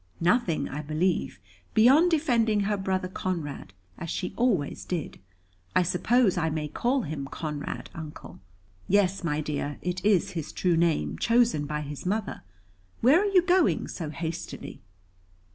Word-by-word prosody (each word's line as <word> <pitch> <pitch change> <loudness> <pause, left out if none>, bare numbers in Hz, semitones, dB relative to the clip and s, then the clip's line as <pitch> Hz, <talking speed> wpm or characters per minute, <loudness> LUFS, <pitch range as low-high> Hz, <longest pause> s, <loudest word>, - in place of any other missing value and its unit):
"Nothing, 170 - +2
I 145 - -5
believe, 155 - -1 0.4
beyond 270 +10 +6
defending 235 -10 +2
her 205 +1 0
brother 190 -1 -1
Conrad, 165 - -4 0.3
as 170 - -5
she 180 - -3
always 215 - 0
did. 170 -5 -4 0.6
I - - +5
suppose 190 +3 +2
I 160 -1 +1
may 155 -1 -2
call 250 - 0
him 145 -2 -5
'Conrad,' 150 0 -5
Uncle?" 155 -2 -9 0.5
"Yes, 195 -1 +2
my 155 -2 0
dear, 145 -1 -3
it 180 +1 -3
is 200 -4 +3
his 160 -4 -5
true 180 -2 +1
name, 165 -1 +1
chosen 230 -11 +2
by 150 0 -2
his 145 -1 -7
mother. 210 +4 -2 0.6
Where 275 +10 +6
are - - +1
you 365 -3 +5
going 360 -1 +2
so 160 -4 -5
hastily?" 165 +2 -6
180 Hz, 145 wpm, -27 LUFS, 155-225 Hz, 0.6 s, beyond